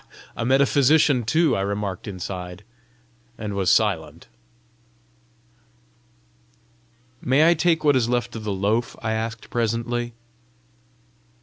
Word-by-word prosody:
a - - -3
metaphysician 140 +1 +3
too!" 155 +7 +2
I 95 - -1
remarked 100 -1 -3
inside, 90 -1 -6 0.7
and 105 -2 -5
was 95 -2 0
silent. 85 -7 0 2.9
"May 140 +5 +3
I 170 - +6
take 165 -1 +1
what 145 -2 +4
is 120 -2 +1
left 120 -1 -1
of 110 - -6
the 105 - -3
loaf?" 105 +5 -1
I 110 - -1
asked 115 +1 -5
presently. 120 +1 -2
115 Hz, 110 wpm, -23 LUFS, 100-130 Hz, 2.9 s, I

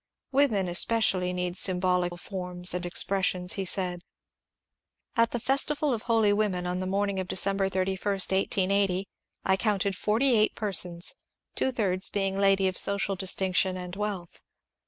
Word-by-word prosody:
" - - -61
Women 255 -9 +2
especially 185 0 +2
need 180 -1 -3
symbolical 180 -1 +1
forms 180 -1 -2
and 180 0 -3
expressions," 180 0 +1
he 195 - -3
said. 180 -1 -3 1.1
At 230 0 +3
the 240 - -3
"Festival 280 +3 +1
of 225 - -3
Holy 225 -3 +2
Women," 200 -4 -1
on 180 +1 -2
the 185 - -3
morning 200 0 -1
of 185 - -4
December 195 +1 0
31, 190 +2 -1
1880, 195 0 +1 0.4
I 190 - +3
counted 200 -2 0
forty 230 +6 +1
eight 215 0 +2
persons, 180 -4 +1 0.4
two 265 - 0
thirds 195 -6 0
being 195 -1 -1
ladies 195 -1 +3
of 185 - -4
social 200 0 +2
distinction 190 0 0
and 180 0 -7
wealth. 200 -4 -5
195 Hz, 150 wpm, -27 LUFS, 180-205 Hz, 1.1 s, At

